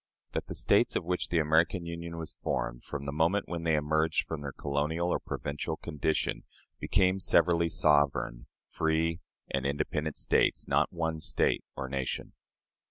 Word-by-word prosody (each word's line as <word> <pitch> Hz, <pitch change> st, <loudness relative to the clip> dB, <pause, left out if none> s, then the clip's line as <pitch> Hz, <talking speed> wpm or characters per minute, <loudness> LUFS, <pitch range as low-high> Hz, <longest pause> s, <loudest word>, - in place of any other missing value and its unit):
That -, -, -3 dB
the -, -, -5 dB
States -, -, +3 dB
of -, -, 0 dB
which 90 Hz, +1 st, -1 dB
the 85 Hz, -, +1 dB
American 80 Hz, +3 st, +2 dB
Union 85 Hz, 0 st, -6 dB
was 80 Hz, -2 st, -4 dB
formed, -, -, -3 dB
from 70 Hz, -1 st, -5 dB
the 70 Hz, -, -3 dB
moment 85 Hz, +7 st, +1 dB
when 85 Hz, -1 st, -4 dB
they 80 Hz, -1 st, +2 dB
emerged 80 Hz, +1 st, +1 dB
from 80 Hz, -2 st, -5 dB
their 70 Hz, -1 st, -4 dB
colonial 75 Hz, +6 st, -1 dB
or -, -, +1 dB
provincial 75 Hz, +3 st, -4 dB
condition, 80 Hz, -1 st, -1 dB, 0.4 s
became 95 Hz, 0 st, +2 dB
severally 85 Hz, -1 st, +3 dB
sovereign, 70 Hz, -6 st, +2 dB, 0.2 s
free, 80 Hz, +1 st, 0 dB, 0.3 s
and 70 Hz, -1 st, 0 dB
independent 75 Hz, +2 st, -2 dB
States -, -, +2 dB
not 75 Hz, +2 st, +2 dB
one 80 Hz, -2 st, -2 dB
State, -, -, +1 dB
or 65 Hz, -, -4 dB
nation. 65 Hz, -1 st, -3 dB
80 Hz, 160 wpm, -30 LUFS, 75-85 Hz, 0.4 s, States